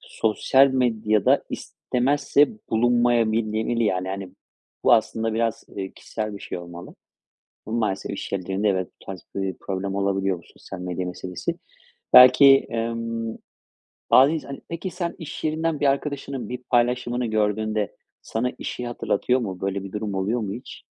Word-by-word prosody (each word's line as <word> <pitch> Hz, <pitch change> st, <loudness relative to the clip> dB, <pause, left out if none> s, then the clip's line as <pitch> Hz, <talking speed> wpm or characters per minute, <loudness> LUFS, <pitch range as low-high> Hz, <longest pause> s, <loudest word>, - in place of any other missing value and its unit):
sosyal 130 Hz, +5 st, +3 dB
medyada 110 Hz, -5 st, +2 dB
istemezse 140 Hz, +3 st, +1 dB, 0.2 s
bulunmayabilmeli. 115 Hz, -1 st, +2 dB
Yani, 95 Hz, -2 st, 0 dB
hani, 95 Hz, -1 st, -5 dB, 0.5 s
bu -, -, +6 dB
aslında 110 Hz, 0 st, +2 dB
biraz, 115 Hz, -1 st, -1 dB
eee, 95 Hz, -1 st, -4 dB
kişisel 110 Hz, -1 st, -5 dB
bir -, -, -11 dB
şey -, -, -5 dB
olmalı. 85 Hz, 0 st, -10 dB, 0.7 s
Ama 110 Hz, +2 st, -2 dB
maalesef, 105 Hz, -4 st, -1 dB
iş 100 Hz, -, -6 dB
yerlerinde, 95 Hz, +2 st, 0 dB
evet, 95 Hz, -1 st, 0 dB
bu -, -, -17 dB
tarz, 95 Hz, -3 st, -7 dB
böyle, 95 Hz, -1 st, -2 dB
problem 95 Hz, 0 st, -3 dB
olabiliyor 95 Hz, -1 st, 0 dB
bu -, -, -19 dB
sosyal 95 Hz, -, -10 dB
medya 90 Hz, 0 st, -3 dB
meselesi. 90 Hz, 0 st, -4 dB, 0.6 s
Belki, 130 Hz, +2 st, +8 dB
emm, 115 Hz, 0 st, -3 dB, 0.7 s
bazı 135 Hz, +4 st, +7 dB
ins 160 Hz, -, -3 dB
hani, 140 Hz, -1 st, -8 dB
peki, 170 Hz, +3 st, -4 dB
sen 175 Hz, -1 st, -3 dB
iş 160 Hz, 0 st, -7 dB
yerinden 155 Hz, 0 st, 0 dB
bir -, -, +2 dB
arkadaşının 140 Hz, -1 st, -2 dB
bir 125 Hz, -, -4 dB
paylaşımını 120 Hz, 0 st, +1 dB
gördüğünde 110 Hz, -1 st, 0 dB, 0.3 s
sana 125 Hz, +3 st, -1 dB
işi 125 Hz, -, -5 dB
hatırlatıyor 120 Hz, +1 st, 0 dB
mu? 95 Hz, -6 st, -5 dB
Böyle 100 Hz, 0 st, -2 dB
bir 95 Hz, -, -8 dB
durum 105 Hz, -1 st, -3 dB
oluyor 100 Hz, +6 st, 0 dB
mu 100 Hz, -3 st, -3 dB
hiç? 120 Hz, +4 st, -9 dB
110 Hz, 150 wpm, -24 LUFS, 100-125 Hz, 0.7 s, Belki